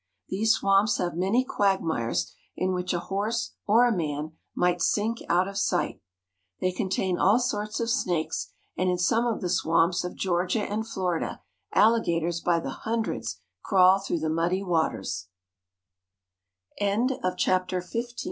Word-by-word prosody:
These 220 +4 +3
swamps 195 +2 +3
have 175 - -1
many 195 +8 +2
quagmires 160 - 0 0.2
in 185 0 0
which 180 0 -2
a 175 - 0
horse 215 +6 -2 0.2
or 225 +4 +6
a 235 - +1
man 155 -2 -3 0.2
might 180 -1 +1
sink 220 +6 +1
out 180 +2 +3
of 200 0 -4
sight. - - 0 0.6
They 185 - +1
contain 185 -1 -1
all 200 +5 +5
sorts 215 -4 -2
of 230 - -1
snakes, 180 -10 -1 0.2
and 185 +1 +1
in 180 - +1
some 225 +7 +2
of 230 - -1
the 180 - -1
swamps 170 0 +2
of 180 - -5
Georgia 180 +3 0
and 215 +2 -3
Florida 180 -6 -2 0.3
alligators 170 -7 +2
by 170 -1 +2
the 135 - -5
hundreds 225 +7 -3 0.2
crawl 190 -1 +5
throu 195 -3 -2
190 Hz, 130 wpm, -27 LUFS, 175-215 Hz, 0.6 s, or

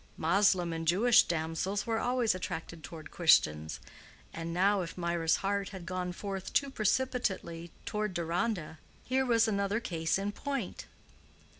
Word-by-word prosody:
Moslem 180 0 +3
and 165 0 -4
Jewish 230 +8 +6
damsels 170 +5 -2
were 225 -1 0
always 245 -3 +2
attracted 165 -2 -5
toward 155 -2 -9
Christians, 80 - +3 0.5
and 165 0 -5
now 195 +3 +3
if 170 0 -6
Mirah's 170 -2 +1
heart 200 0 0
had 190 -4 -8
gone 180 0 -3
forth 195 +1 -5
too 280 -1 +2
precipitately 215 -8 -1 0.2
toward 210 -3 -2
Deronda, 170 -1 -2 0.2
here 260 +1 0
was 230 -1 +4
another 200 0 0
case 170 -8 -1
in 200 +1 -2
point. 270 -1 -4
190 Hz, 140 wpm, -31 LUFS, 165-215 Hz, 0.5 s, Jewish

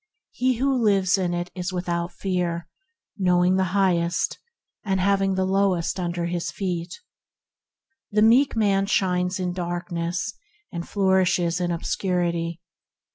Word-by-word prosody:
He 255 0 +1
who 265 +1 +1
lives 195 -3 +3
in 180 -2 0
it 175 0 -4
is 180 0 -4
without 175 -1 -2
fear, 175 -2 -2 0.5
knowing 180 0 +3
the 190 - +2
Highest 175 -3 +1 0.4
and 195 -2 0
having 195 0 +2
the 190 0 +1
lowest 190 -2 +1
under 175 -1 -2
his 170 0 -2
feet. 175 -3 -4 1.1
The 210 0 +3
meek 245 +5 +5
man 200 -3 +2
shines 180 -1 +1
in 180 -1 -2
darkness, 175 +1 -3 0.4
and 170 -3 -6
flourishes 185 -3 +2
in 175 - 0
obscurity. 170 -1 -1
180 Hz, 130 wpm, -24 LUFS, 175-195 Hz, 1.1 s, meek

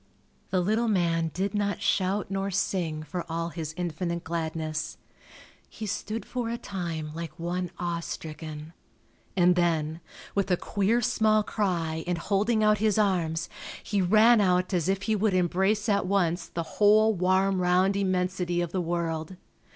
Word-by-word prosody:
The 185 - +1
little 220 +6 +1
man 170 -5 +1
did 195 +4 -2
not 205 -1 0
shout 195 0 0
nor 195 0 -1
sing 175 -5 -1
for 175 +3 -4
all 165 +1 -2
his 160 -2 -6
infinite 170 0 -3
gladness. 160 -2 -3 0.7
He 220 - -7
stood 215 +2 -4
for 245 -2 -3
a 235 - -2
time 165 -8 -5
like 165 -1 -6
one 175 +1 -2
awe 175 -1 -2
stricken, 155 -1 -7 0.6
and 180 0 +5
then, 165 -2 0 0.3
with 200 -1 0
a 180 - +3
queer 205 +7 +1
small 215 0 +3
cry 170 -7 -1
and 175 -1 0
holding 210 +5 +1
out 215 -1 +4
his 215 -1 +2
arms, 170 -6 +1 0.4
he 205 -3 0
ran 215 +5 +6
out 185 0 +2
as 175 -1 +1
if 195 0 0
he 220 0 +1
would 210 -1 +1
embrace 190 +4 +1
at 200 -3 +2
once 175 -3 +1
the 170 - -4 0.2
whole 215 +1 +6
warm 185 +1 +2
round 180 +2 +3
immensity 180 -2 0
of 175 -2 -1
the 185 - -1
world. 165 0 -2
180 Hz, 160 wpm, -27 LUFS, 170-200 Hz, 0.7 s, ran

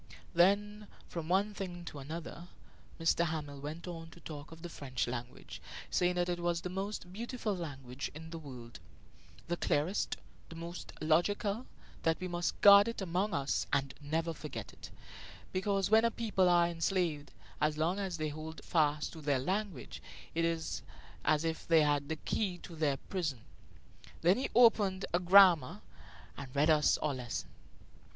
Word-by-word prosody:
Then, 205 +4 +3 0.2
from 165 -2 -5
one 200 +3 +2
thing 175 -3 -6
to 145 - -7
another, 165 +4 -7 0.5
M. 165 +1 +3
Hamel 150 -3 -4
went 155 +5 -6
on 165 -2 -7
to 165 - -15
talk 150 -2 -8
of 165 +1 -12
the - - -4
French 135 -6 -3
language, 120 0 -7 0.3
saying 180 0 +2
that 175 0 +1
it 175 -1 -1
was 170 -1 0
the 180 - -4
most 190 -1 -4
beautiful 230 -1 -3
language 135 -6 -5
in 160 +1 -9
the 165 - -5
world 125 -6 -10 0.7
the 175 0 -1
clearest, 170 +7 0 0.3
the 165 - -9
most 170 +2 -7
logical; 200 +8 +1 0.3
that 165 0 +1
we 185 - -3
must 175 -1 -2
guard 200 +1 +9
it 230 - -3
among 190 +1 0
us 140 -1 0
and 135 -1 +1
never 160 +3 -1
forget 135 -9 -7
it, - - -11 0.6
because 195 +1 0
when 220 +1 +7
a 230 - +4
people 210 -6 +1
are 175 -1 +5
enslaved, 165 -3 -1 0.3
as 150 0 +2
long 170 +5 +1
as 190 -4 -2
they 155 -1 -1
hold 155 +2 -7
fast 150 -2 +1
to 160 - -9
their 145 -2 +2
language 185 +2 -3 0.3
it 165 - 0
is 165 -1 -1 0.4
as 155 +1 +2
if 160 -1 -3
they 165 -2 +6
had 145 -1 +1
the 160 - 0
key 185 +3 -2
to 170 - -9
their 150 -3 +1
prison. 155 - -3 0.8
Then 180 +7 +5
he 265 - -1
opened 210 -5 +5
a 175 - +4
grammar 180 -6 +6 0.5
and 135 -2 -7
read 150 +3 +4
us 150 -1 +4
our 150 - -1
lesson. 125 -2 -4
170 Hz, 170 wpm, -33 LUFS, 150-185 Hz, 0.8 s, guard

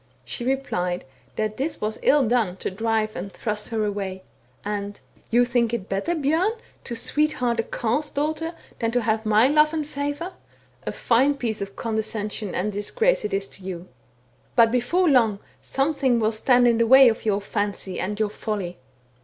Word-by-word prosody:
She 240 - -4
replied 180 -9 -1 0.3
that 215 0 -2
this 290 +4 -2
was 215 +1 -3
ill 280 -4 +4
done 220 -6 +1
to - - -4
drive 220 +1 -1
and 195 +3 -5
thrust 210 -1 -3
her 220 -2 0
away: 195 -2 -4 0.4
and 205 -1 -4 0.2
* - - -31
You 240 +1 +4
think 240 -1 +1
it 200 -5 -6
better, 195 - -1
Bjom, 320 +8 +1 0.3
to 235 - -4
sweetheart 250 -2 +1
a - - +2
Carle's 245 +7 -1
daughter, 315 +3 -2 0.2
than 230 - 0
to 245 - +2
have 220 0 0
my 215 +3 +5
love 305 +2 +4
and 310 -2 -1
favour, 290 +5 -4 0.5
a - - 0
fine 265 +5 +2
piece 225 -6 -3
of 195 0 -5
condescension 215 -3 -3
and 185 +4 0
a - - -3
disgrace 455 - +1
it 210 - -2
is 195 0 -1
to 195 - -12
you! 185 -1 -6 0.7
But, 230 -2 +6
before 255 +10 +2
long, 235 -8 +4 0.2
something 270 -3 +1
will 220 0 +2
stand 245 +2 +4
in 235 -1 +3
the 230 - +3
way 265 +2 +9
of 225 -1 +1
your 205 -2 +1
fancy, 200 -2 -3
and 205 +3 -3
your 215 -1 +1
folly. 200 -5 -4
230 Hz, 185 wpm, -24 LUFS, 210-270 Hz, 0.7 s, way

